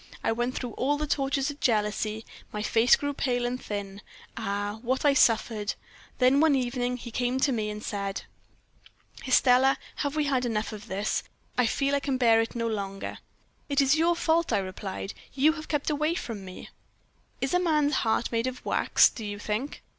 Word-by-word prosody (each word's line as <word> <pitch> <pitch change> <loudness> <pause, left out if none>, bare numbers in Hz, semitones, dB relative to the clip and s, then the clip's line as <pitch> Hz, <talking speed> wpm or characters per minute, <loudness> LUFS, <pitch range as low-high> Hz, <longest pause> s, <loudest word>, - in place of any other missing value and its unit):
I - - +2
went 240 +3 -1
through 245 -2 -4
all 285 +6 0
the 305 - -2
tortures 275 0 0
of 290 - -13
jealousy, 215 -1 0 0.3
my 210 0 -3
face 230 +3 +5
grew 285 0 -3
pale 245 -3 0
and 250 +1 -2
thin. 200 -1 -5 0.3
Ah! 205 -1 -3
what 260 +4 -1
I 285 - +6
suffered! 225 -4 +2 0.4
Then 255 +2 +4
one 310 -2 +5
evening 250 -1 -1
he 235 -1 -9
came 250 +3 0
to 275 - +3
me 215 -4 -1
and 210 +1 -6
said: 200 -1 -3 1.0
"'Estelle, 260 +1 +5 0.2
have 285 0 -2
we 305 - +2
had 270 -3 +1
enough 220 -3 -1
of 210 -1 -9
this? 200 +3 -1 0.3
I 250 -2 +3
feel 275 +4 0
I 280 - +3
can 275 -2 -1
bear 230 -3 +5
it 225 - -4
no 230 -1 -1
longer.' 195 -3 -4 0.5
"'It 280 - +1
is 275 0 +5
your 335 +2 +3
fault,' 335 0 +1
I - - +3
replied; 190 0 -5 0.2
'you 295 +3 +4
have 310 -1 -8
kept 295 0 -1
away 305 +3 0
from 225 - -5
me.' 185 -1 -10 0.7
"'Is 270 - -1
a 360 - +4
man's 305 -4 +2
heart 225 +1 0
made 230 +1 0
of 255 0 -6
wax, - - +4
do 230 - -7
you 205 -1 -4
think? 215 +7 -4
245 Hz, 190 wpm, -27 LUFS, 215-280 Hz, 1.0 s, I